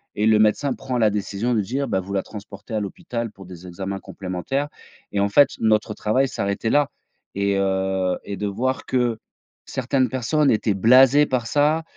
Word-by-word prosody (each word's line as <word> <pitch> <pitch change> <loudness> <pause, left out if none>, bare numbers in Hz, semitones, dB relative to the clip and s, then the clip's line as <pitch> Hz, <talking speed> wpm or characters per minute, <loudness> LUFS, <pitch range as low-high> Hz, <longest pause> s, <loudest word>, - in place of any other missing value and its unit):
et 105 - 0
le 110 -1 +5
médecin 110 +6 +2
prend 130 -2 -4
la 110 -3 +4
décision 105 +3 -2
de 110 - +2
dire: 135 +7 -2
«Bah, 95 - 0
vous 100 +2 -7
la 95 - 0
transportez 105 +2 -10
à 110 - +1
l'hôpital 115 +3 -5
pour 95 -1 -13
des 90 0 -11
examens 95 +2 -5
complémentaires» 95 +13 -4 0.5
et 100 - 0
en 100 - +2
fait, 140 +6 +6
notre 110 -1 +2
travail 130 +7 +1
s'arrêtait 100 -2 -2
là 145 +3 +3 0.5
et 100 0 +1
heu, 95 -1 0
et 100 - -4
de 105 - -2
voir 125 +6 -2
que 120 -3 0 0.5
certaines 130 0 0
personnes 130 +4 +1
étaient 110 -1 +1
blasées 130 +8 +6
par 125 -3 -1
ça, 150 +4 +2
110 Hz, 185 wpm, -22 LUFS, 100-130 Hz, 0.5 s, fait